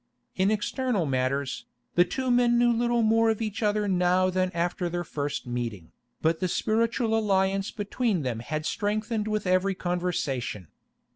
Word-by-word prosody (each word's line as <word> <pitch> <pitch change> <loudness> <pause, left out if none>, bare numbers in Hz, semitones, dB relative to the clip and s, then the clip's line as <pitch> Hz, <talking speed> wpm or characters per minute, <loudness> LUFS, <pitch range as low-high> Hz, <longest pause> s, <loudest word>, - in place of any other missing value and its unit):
In 190 +1 +2
external 215 - 0
matters, 130 -2 -1 0.3
the 175 - +6
two 260 +6 -2
men 245 -1 +4
knew 240 0 +4
little 235 0 +1
more 225 +1 +4
of 220 - 0
each 215 -1 -3
other 210 -1 +1
now 185 0 +2
than 185 0 +1
after 175 0 -1
their 175 +1 -2
first 145 -3 -4
meeting, 115 -8 -4 0.3
but 160 +1 +2
the 185 - 0
spiritual 225 +4 +1
alliance 195 -2 +1
between 205 - -1
them 120 -3 -2
had 155 +5 -4
strengthened 215 +2 -1
with 215 -1 -1
every 185 +1 +2
conversation. 165 - -2
190 Hz, 155 wpm, -27 LUFS, 165-220 Hz, 0.3 s, the